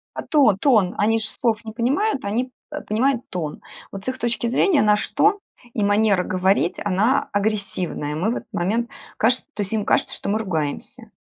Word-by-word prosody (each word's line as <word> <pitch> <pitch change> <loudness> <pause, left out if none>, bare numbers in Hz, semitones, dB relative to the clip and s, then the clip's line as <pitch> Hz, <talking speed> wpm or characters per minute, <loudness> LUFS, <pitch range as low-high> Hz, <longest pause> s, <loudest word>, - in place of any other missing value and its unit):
А - - -3
тон 270 -11 +4
тон. 210 -7 +3
Они 225 +2 +2
ж - - -3
слов 225 0 -1
не 220 - -7
понимают, 265 - 0
они, 240 +6 -2 0.2
э, 300 0 -5
понимают 245 +3 0
тон. 160 -5 -4 0.3
Вот 195 0 -8
с - - -10
их 260 0 -2
точки 235 -1 -1
зрения 290 +6 +3
наш 210 0 +2
тон 410 -1 +3 0.3
и 210 - -1
манера 205 -2 +3
говорить 185 -1 +1
она 210 +7 +2
агрессивная. 200 -7 -2
Мы 185 +9 0
в - - -2
этот - - -11
момент 225 +7 0 0.3
кажется, 245 +3 +2
то 210 - -3
есть 200 +2 -3
им 215 - 0
кажется, - - +1
что - - -5
мы 210 +2 +1
ругаемся. 160 -9 -4
215 Hz, 190 wpm, -22 LUFS, 195-240 Hz, 0.3 s, тон